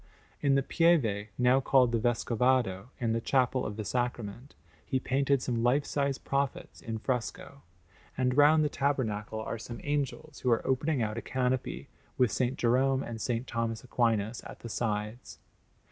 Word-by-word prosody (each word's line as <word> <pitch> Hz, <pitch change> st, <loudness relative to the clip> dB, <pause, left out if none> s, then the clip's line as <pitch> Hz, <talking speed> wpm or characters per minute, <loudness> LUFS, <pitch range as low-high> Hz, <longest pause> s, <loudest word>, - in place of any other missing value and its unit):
In 140 Hz, -1 st, +3 dB
the 135 Hz, -, +2 dB
Pieve, 125 Hz, -12 st, +2 dB
now 125 Hz, +1 st, +4 dB
called 130 Hz, -2 st, +4 dB
the 115 Hz, -, +1 dB
Vescovado, 120 Hz, -3 st, +1 dB
in 115 Hz, -3 st, 0 dB
the 115 Hz, -, 0 dB
Chapel 130 Hz, 0 st, +1 dB
of 105 Hz, -, -6 dB
the 110 Hz, -, -4 dB
Sacrament, 120 Hz, +1 st, -3 dB, 0.3 s
he 130 Hz, -, -1 dB
painted 135 Hz, 0 st, +1 dB
some 120 Hz, -2 st, -1 dB
life 125 Hz, +5 st, +2 dB
size 140 Hz, -1 st, -1 dB
prophets 140 Hz, -1 st, -3 dB
in 115 Hz, -3 st, -4 dB
fresco; 130 Hz, +3 st, -4 dB, 0.6 s
and 125 Hz, -1 st, +1 dB
round 150 Hz, +2 st, +6 dB
the -, -, +3 dB
tabernacle 110 Hz, -7 st, -1 dB
are 110 Hz, +1 st, -4 dB
some 120 Hz, +1 st, -7 dB
angels 145 Hz, +1 st, -3 dB
who 125 Hz, -, 0 dB
are 115 Hz, -, +2 dB
opening 135 Hz, 0 st, +1 dB
out 110 Hz, +1 st, -2 dB
a -, -, -7 dB
canopy, 130 Hz, 0 st, -2 dB, 0.3 s
with 125 Hz, -4 st, +3 dB
S. 125 Hz, -1 st, +2 dB
Jerome 130 Hz, +3 st, +2 dB
and 115 Hz, -, -6 dB
S. 125 Hz, -, -4 dB, 0.2 s
Thomas 115 Hz, -1 st, -3 dB
Aquinas 115 Hz, -3 st, 0 dB
at -, -, -11 dB
the 115 Hz, -, -7 dB
sides. 105 Hz, +1 st, -3 dB
125 Hz, 165 wpm, -30 LUFS, 115-135 Hz, 0.6 s, round